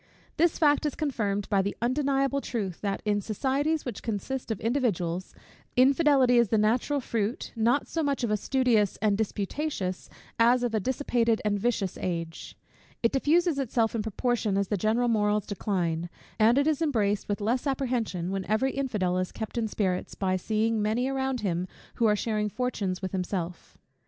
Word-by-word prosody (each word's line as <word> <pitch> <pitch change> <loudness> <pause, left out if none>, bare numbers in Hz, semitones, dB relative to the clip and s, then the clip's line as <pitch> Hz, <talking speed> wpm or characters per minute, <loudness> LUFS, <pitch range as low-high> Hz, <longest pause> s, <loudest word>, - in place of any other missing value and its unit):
This 340 0 +3
fact 295 -3 +3
is 295 - -4
confirmed 210 -9 -1
by 200 -2 +3
the 200 +1 -3
undeniable 275 +2 +1
truth, 200 -10 -4
that 200 -1 -2
in 205 -1 +1
societies, 275 +9 -1
which 245 -5 -5
consist 240 +5 -4
of 220 -4 -2
individuals, 195 -8 -1 0.4
infidelity 265 -2 +5
is 235 - +4
the 220 - +2
natural 235 +7 +2
fruit, 230 -3 -3
not 235 +5 +2
so 330 - -2
much 280 -4 -1
of 230 - 0
a - - +3
studious 235 -4 +2
and 210 -1 +2
disputatious, 205 -1 -3 0.3
as 240 +2 +5
of 240 -2 -1
a 220 - +2
dissipated 235 -1 +1
and 205 -1 +1
vicious 205 -4 -1
age. 165 -2 -4 0.5
It 230 - +4
diffuses 315 +3 +2
itself 230 -4 +1
in 230 - -1
proportion 220 -1 0
as 200 -1 0
the 210 - +1
general 220 +5 +1
morals 210 -2 +1
decline; 175 -5 -2 0.3
and 225 +4 +5
it 280 - +3
is 310 0 +1
embraced 210 -11 0
with 205 - -1
less 240 +7 0
apprehension, 240 -10 -1
when 195 0 -2
every 220 +6 +1
infidel 210 -10 -1
is 185 - -2
kept 220 -2 -6
in 230 -2 0
spirits, 190 -4 -2
by 185 -1 0
seeing 220 +3 0
many 220 +5 +1
around 265 -2 -1
him 180 -3 -1 0.3
who 230 - +3
are 210 - +4
sharing 210 0 -1
fortunes 200 -6 -2
with 185 - -2
himself. 180 -2 -4
220 Hz, 175 wpm, -27 LUFS, 200-260 Hz, 0.5 s, infidelity